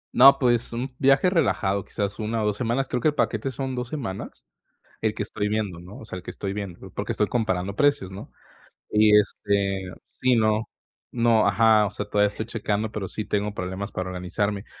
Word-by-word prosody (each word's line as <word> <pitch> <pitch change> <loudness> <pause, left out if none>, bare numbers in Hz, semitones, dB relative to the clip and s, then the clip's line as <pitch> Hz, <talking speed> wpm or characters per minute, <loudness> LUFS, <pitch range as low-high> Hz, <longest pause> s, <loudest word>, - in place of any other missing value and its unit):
No, 135 +2 +9
pues, 120 -3 +1
un 125 +3 -3
viaje 135 +6 +4
relajado, 100 - +1
quizás 100 +3 -4
1 110 0 -1
o - - 0
2 105 - +1
semanas. 125 +3 0
Creo 125 - -2
que - - +2
el 150 - +1
paquete 110 +4 0
son 130 0 -4
2 125 -1 -3
semanas, 115 -11 -6 0.6
el 110 -1 0
que 105 - -2
estoy 105 0 -3
viendo, 105 -5 -2
¿no? 90 +4 -11
O - - -10
sea, 95 - -7
el 90 - -9
que - - -7
estoy 100 -1 -4
viendo, 100 -4 -7
porque - - -3
estoy - - +2
comparando 100 -5 -1
precios, 145 -7 +2
¿no? 95 +1 -9 0.6
Y 105 0 +6
este, 100 -1 0 0.2
sí 125 -1 +1
no. 110 0 +1 0.4
No, 115 -3 +3
ajá, 105 +1 +4
o - - -7
sea, - - -4
todavía 105 0 +3
estoy 105 +2 -5
checando, 110 -2 -2
pero 100 -4 -4
sí 110 - -5
tengo 105 0 -1
problemas 95 +3 -4
para 90 0 -4
organizarme. 100 +3 -2
105 Hz, 205 wpm, -25 LUFS, 100-120 Hz, 0.6 s, No